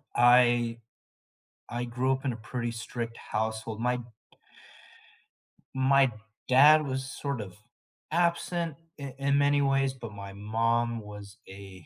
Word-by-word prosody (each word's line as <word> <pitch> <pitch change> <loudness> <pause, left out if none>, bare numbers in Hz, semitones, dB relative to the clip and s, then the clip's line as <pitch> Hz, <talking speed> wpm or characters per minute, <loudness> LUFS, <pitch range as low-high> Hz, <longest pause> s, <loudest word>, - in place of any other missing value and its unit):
I 120 -1 +5 0.9
I 120 +1 -3
grew 125 +2 0
up 135 +1 -3
in 130 - 0
a - - -6
pretty 120 +2 -4
strict 115 0 -5
household, 110 0 -3
my 125 +1 +1 1.8
my 135 -1 +4 0.4
dad 150 +4 +7
was 130 0 -3
sort 140 -5 -4
of 95 -3 -9 0.6
absent 170 -1 0 0.2
in 140 -2 -7
in 140 +1 +1
many 145 0 +3
ways, 135 -1 +2
but 115 -4 -9
my 100 -1 -9
mom 115 +3 0
was 105 0 -10
a, 95 -3 -12
120 Hz, 125 wpm, -28 LUFS, 110-135 Hz, 1.8 s, dad